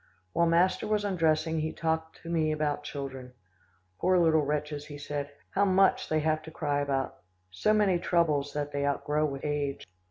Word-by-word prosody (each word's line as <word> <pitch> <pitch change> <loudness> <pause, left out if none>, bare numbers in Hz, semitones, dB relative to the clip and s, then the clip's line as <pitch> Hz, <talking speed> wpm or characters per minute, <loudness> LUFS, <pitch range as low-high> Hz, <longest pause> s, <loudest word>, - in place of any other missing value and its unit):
While 170 - +3
master 175 +5 +2
was 210 -1 +1
undressing, 160 -4 +1
he 155 +1 -1
talked 160 0 -3
to 165 - -7
me 160 -2 +1
about 150 -1 -1
children. 135 -3 -7 0.7
"Poor 185 +1 +3
little 160 -2 +4
wretches," 150 0 -2
he 145 - -8
said. 145 0 -4 0.2
"How 200 - +2
much 195 0 +3
they 155 0 +2
have 155 0 +1
to 160 - -10
cry 145 -3 -1
about. 135 -2 -1 0.3
So 95 - +1
many 205 -4 +3
troubles 155 -5 +1
that 145 0 -3
they 140 0 -2
outgrow 150 +2 0
with 135 0 -6
age." 145 -2 -2
155 Hz, 180 wpm, -29 LUFS, 145-170 Hz, 0.7 s, little